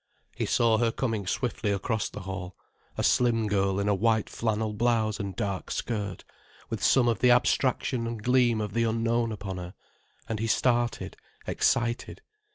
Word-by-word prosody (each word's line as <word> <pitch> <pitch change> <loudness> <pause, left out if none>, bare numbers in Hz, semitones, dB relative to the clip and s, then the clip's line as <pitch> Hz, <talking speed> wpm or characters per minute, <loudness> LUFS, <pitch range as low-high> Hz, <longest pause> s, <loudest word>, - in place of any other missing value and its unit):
He - - -2
saw 115 -2 +3
her 115 -1 +2
coming 110 -6 -2
swiftly 115 0 -1
across 105 +2 -1
the - - -8
hall, 95 -1 -6 0.4
a - - -1
slim 115 -3 +3
girl 100 -1 +1
in 100 - 0
a 105 - +3
white 110 +2 +1
flannel 110 -1 -1
blouse 110 -1 +1
and 100 -2 -4
dark 100 -4 -3
skirt, 100 -6 -3 0.5
with 110 -4 -3
some 125 +1 +4
of 115 - +1
the 125 - +4
abstraction 125 0 +2
and 115 -2 -5
gleam 120 -2 +3
of 105 -2 -4
the 115 +1 +1
unknown 115 +1 +1
upon 100 -3 -5
her, 90 +1 -7 0.5
and 110 -2 -3
he 115 - -1
started, 120 +1 0 0.3
excited. 120 0 0
110 Hz, 165 wpm, -27 LUFS, 100-120 Hz, 0.5 s, some